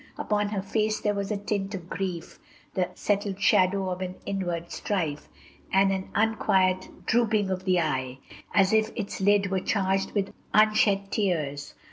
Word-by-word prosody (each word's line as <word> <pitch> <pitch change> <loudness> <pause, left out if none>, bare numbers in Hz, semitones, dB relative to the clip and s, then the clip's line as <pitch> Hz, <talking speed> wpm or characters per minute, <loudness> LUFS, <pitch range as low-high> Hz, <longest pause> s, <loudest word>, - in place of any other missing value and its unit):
Upon 210 -1 0
her 200 -2 -2
face 215 +2 0
there 210 - 0
was 200 -1 -3
the 210 - -1
tint 200 0 -2
of 180 -3 -8
grief, 180 -3 -5 0.3
The 185 -1 0
settled 200 -1 -1
shadow 190 0 +3
of 180 +1 -4
an 185 0 -4
inward 175 -4 -3
strife, 160 -8 -2 0.4
And 195 0 +4
an 190 -1 -3
unquiet 190 -4 +1
drooping 220 -4 +2
of 185 0 -3
the 185 -2 +3
eye, 130 -5 -2 0.3
As 195 +1 +3
if 220 0 +3
its 200 -3 -4
lid 200 0 +3
were 190 - +1
charged 195 0 0
with 200 -2 -1 0.2
unshed 210 -2 +4
tears. 155 -8 -1
195 Hz, 160 wpm, -27 LUFS, 185-205 Hz, 0.4 s, And